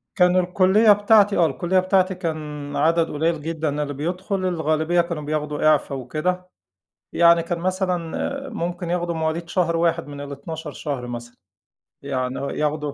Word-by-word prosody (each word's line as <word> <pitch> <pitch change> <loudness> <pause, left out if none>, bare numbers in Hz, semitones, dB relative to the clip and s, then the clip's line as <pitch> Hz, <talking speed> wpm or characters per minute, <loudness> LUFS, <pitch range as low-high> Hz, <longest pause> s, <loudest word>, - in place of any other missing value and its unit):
كان 180 0 +4
الكلّية 185 +4 +4
بتاعتي 205 0 +4
آه، 170 - +5
الكلّية 180 +3 +1
بتاعتي 185 0 +2
كان 150 -4 -5
عدد 165 +2 +2
قليّل 160 +1 0
جدًا 155 -2 -2
اللي 145 -1 -4
بيدخل، 180 +7 -3
الغالبية 160 0 +1
كانوا 170 -3 -4
بياخدوا 150 0 -2
إعفا 145 -2 +2
وكده. 180 +8 -3 0.6
يعني 170 0 +5
كان 170 0 -3
مثلًا 185 +9 -2
ممكن 175 -5 -4
ياخدوا 175 -1 -1
مواليد 160 +1 -2
شهر 170 -3 +1
1 170 -1 +1
من 145 -1 -8
ال12 150 +3 -7
شهر 140 -4 -5
مثلًا. 120 0 -7 0.7
يعني 130 0 -3
آه، 140 - -3
ياخدوا 150 -1 -2
165 Hz, 150 wpm, -22 LUFS, 150-180 Hz, 0.7 s, آه